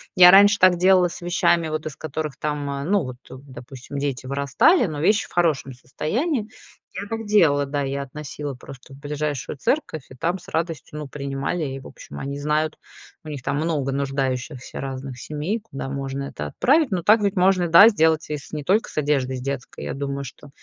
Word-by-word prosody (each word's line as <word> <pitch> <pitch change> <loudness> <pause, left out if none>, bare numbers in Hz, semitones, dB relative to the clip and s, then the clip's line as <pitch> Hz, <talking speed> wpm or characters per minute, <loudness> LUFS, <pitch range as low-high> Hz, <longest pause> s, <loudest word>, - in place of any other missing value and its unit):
Я 180 -1 +9
раньше 205 +2 +7
так 185 -1 +6
делала 185 0 +5
с 175 +1 -9
вещами, 175 -1 +2
вот 155 0 -3
из 155 -3 -5
которых 155 -1 -5
там, 150 -1 -3 0.3
ну, 200 -4 +3
вот, 125 -2 -7
допустим, 130 0 -10
дети 140 -2 -3
вырастали, 140 - +3
но 155 -3 -5
вещи 205 +7 +2
в - - -24
хорошем 155 -6 +1
состоянии. 215 - -2 0.4
Я 200 +3 -6
так 225 +1 -4
делала, 165 -9 +4
да, 145 +1 -2
я 140 +1 -2
относила 145 +1 -6
просто 130 +1 -13
в - - -12
ближайшую 145 -3 -4
церковь, 160 - -1
и - - -12
там 170 +8 -1
с 180 +2 -14
радостью, 165 -3 -3
ну, 150 - -6
принимали. 140 +4 -3
И, 135 -2 -4
в 135 - -11
общем, - - -11
они 140 +1 -4
знают, 150 +2 -1 0.5
у 155 - -9
них 145 -3 -6
там 140 - -1
много 150 -4 -1
нуждающихся 135 -1 -3
разных 135 -1 -6
семей, 155 - -3
куда 135 -11 -7
можно 135 0 -4
это 75 - -6
отправить. 280 - +2
Но 185 -2 0
так 215 +5 +5
ведь 200 -1 0
можно, 180 -1 +3
да, 170 +6 +9
сделать 160 -7 +2
и 150 - -1
с 140 - -13
не 150 -2 -5
только 205 +7 +2
с - - -14
одеждой 140 -3 0
с - - -7
детской. 140 -1 -5
Я - - -3
думаю, 140 0 -4
что 145 +3 -12
150 Hz, 200 wpm, -23 LUFS, 135-180 Hz, 0.5 s, Я